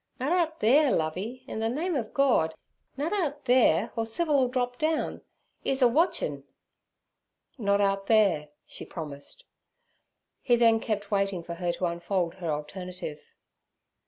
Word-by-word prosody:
'Nut 265 +5 -1
out 325 -3 0
theere, 280 +6 +5
Lovey. 190 +11 -2
In 235 - -5
the 225 0 0
name 325 +8 -1
ov 230 -6 -2
Gord, 240 - +2 0.4
nut 300 +7 -1
out 300 -8 -2
theere, 235 -6 +4
or 225 -1 -1
Civil 295 +5 +1
'll 255 - +3
drop 245 0 -2
down;' 315 0 -1 0.4
'e's 265 -1 +1
a - - +8
watchin'.' 320 +10 +1 1.2
'Not 200 -2 +2
out 195 0 +1
there' 195 -9 +3 0.2
she - - -8
promised. 155 - -8 1.0
He 240 - +3
then 230 -1 +4
kept 210 -2 -3
waiting 195 -3 0
for 170 - -6
her 175 0 -1
to 180 - -2
unfold 175 0 -1
her 170 - -2
alternative. 155 +1 -6
225 Hz, 150 wpm, -28 LUFS, 180-270 Hz, 1.2 s, a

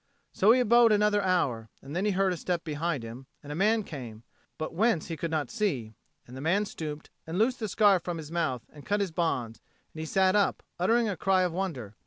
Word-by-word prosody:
So 205 +4 +5
he 250 - +5
abode 235 -1 +5
another 210 0 +3
hour, 140 - 0
and 140 +3 -9
then 185 +3 0
he 210 - +2
heard 190 0 +2
a - - -3
step 175 0 -2
behind 155 -3 -2
him, 120 +4 -9 0.2
and 145 - -8
a - - -4
man 215 +5 +2
came, 120 - -8 0.3
but 155 0 -4
whence 195 -3 +1
he 165 - -3
could 165 +2 -3
not 150 -6 -2
see; 135 - -2 0.3
and 125 - -12
the 130 - -7
man 190 +7 +2
stooped 155 -5 -7 0.2
and 165 +2 -3
loosed 240 +5 +2
the 220 - -2
scarf 200 -3 +4
from 175 -1 -4
his 155 -1 -8
mouth 155 -8 -1
and 145 -2 -12
cut 205 +1 0
his 200 -4 -1
bonds, 130 -9 -2 0.3
and 155 - -9
he 160 - -4
sat 190 +3 +3
up, 205 -1 +1 0.2
uttering 230 +6 +3
a 200 - -1
cry 185 +1 +2
of 180 -2 -1
wonder. 160 - -4
175 Hz, 235 wpm, -28 LUFS, 150-205 Hz, 0.3 s, So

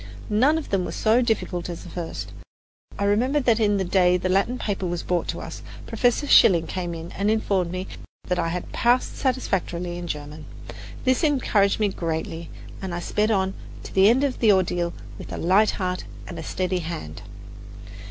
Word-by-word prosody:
None 265 +9 +4
of 320 - -5
them 195 -2 +1
was - - -5
so 225 +3 +3
difficult 200 -7 -1
as 170 - -6
the - - -10
first. 170 -2 -5 0.7
I - - -2
remember 240 +8 +2
that 235 -4 +3
the 205 -3 +2
day 180 0 +3
the 185 +1 -2
Latin 195 +7 +1
paper 195 -5 -2
was 175 0 -3
brought 175 -1 -1
to - - -4
us, - - -8 0.2
Professor 245 +3 +1
Schilling 175 - +6
came 175 -1 -4
in 165 +1 -8
and 200 +2 -1
informed 200 -5 +1
me 185 +1 -4 0.5
I 170 - 0
had 175 +1 -4
passed 245 +2 +2
satisfactorily 180 -9 -1
in 175 - -6
German. 150 0 -6 0.6
This 260 +4 +2
encouraged 235 -10 +2
me 210 -1 +2
greatly, 165 -2 -4 0.3
and 185 -3 -4
I - - -3
sped 210 +4 0
on 190 -3 +1 0.3
to - - -10
the 195 +2 +6
end 255 +4 +3
of 275 -3 -1
the 220 -3 +5
ordeal 175 -3 +1 0.3
with - - -9
a - - -4
light 195 +6 +4
heart 185 -2 -2 0.2
and 170 - -7
a - - -4
steady 185 +2 -1
hand. 155 - -6
190 Hz, 185 wpm, -24 LUFS, 175-220 Hz, 0.7 s, Schilling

